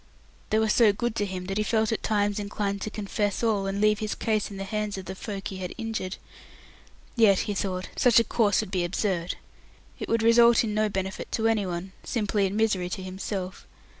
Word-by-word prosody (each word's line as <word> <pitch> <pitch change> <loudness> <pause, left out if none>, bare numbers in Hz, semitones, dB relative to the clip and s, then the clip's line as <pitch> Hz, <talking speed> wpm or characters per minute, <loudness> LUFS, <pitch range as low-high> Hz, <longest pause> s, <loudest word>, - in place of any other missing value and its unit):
They 215 - +2
were 220 0 +3
so 215 0 +5
good 230 +3 -2
to 205 - 0
him 185 -1 -5
that 195 +2 -2
he - - +2
felt 220 0 +1
at 225 - -1
times 205 -1 +1
inclined 200 -1 -2
to 215 - -3
confess 205 0 -2
all, 205 -4 +1
and 195 +1 -2
leave 210 0 +3
his 215 0 -2
case 215 -2 0
in 200 - -8
the 195 - -4
hands 210 0 -3
of 190 - -7
the 190 - -5
folk 195 +1 -5
he 190 - -6
had 180 -1 -5
injured. 225 -5 -3 1.0
Yet 215 -5 +5
he 205 - -2
thought 185 -2 -3
such 240 -2 +5
a - - +4
course 210 -2 +2
would - - -7
be 185 -3 0
absurd. 175 -1 -1 0.6
It - - -5
would 230 0 +2
result 235 +1 +6
in 215 -2 -2
no 215 0 +2
benefit 190 -1 -4
to 225 - 0
anyone, 190 -4 -1
simply 210 -3 0
in 195 - -4
misery 210 -5 +1
to 190 - -4
himself. 185 0 -5
205 Hz, 215 wpm, -27 LUFS, 190-220 Hz, 1.0 s, result